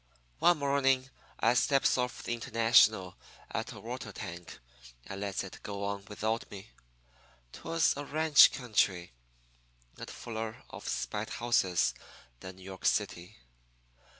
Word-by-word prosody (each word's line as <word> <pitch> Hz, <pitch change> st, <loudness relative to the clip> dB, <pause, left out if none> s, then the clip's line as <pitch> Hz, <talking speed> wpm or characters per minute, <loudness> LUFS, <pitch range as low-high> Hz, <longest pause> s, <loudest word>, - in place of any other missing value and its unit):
"One 175 Hz, -1 st, +5 dB
morning 135 Hz, -2 st, +1 dB, 0.3 s
I 115 Hz, -, +4 dB
steps 135 Hz, +2 st, +3 dB
off 125 Hz, -1 st, -2 dB
the -, -, -2 dB
International 115 Hz, -5 st, +3 dB, 0.3 s
at -, -, -3 dB
a -, -, -10 dB
water -, -, -6 dB
tank 85 Hz, 0 st, -8 dB, 0.5 s
and 95 Hz, 0 st, -7 dB
lets 100 Hz, -1 st, -2 dB
it 95 Hz, -, -10 dB
go 100 Hz, -1 st, -5 dB
on 100 Hz, 0 st, -3 dB
without 110 Hz, +2 st, -2 dB
me. 100 Hz, +1 st, -11 dB, 0.8 s
'Twas 165 Hz, 0 st, +1 dB
a 145 Hz, -, -5 dB
ranch 155 Hz, 0 st, +6 dB
country, 100 Hz, -, 0 dB, 0.9 s
and -, -, -7 dB
fuller 110 Hz, -1 st, -6 dB
of -, -, -9 dB
spite 105 Hz, +1 st, -3 dB
houses 115 Hz, -7 st, +1 dB, 0.5 s
than 95 Hz, 0 st, -9 dB
New 95 Hz, -, -15 dB
York 95 Hz, 0 st, -4 dB
City. 85 Hz, +1 st, -1 dB
110 Hz, 130 wpm, -31 LUFS, 95-130 Hz, 0.9 s, ranch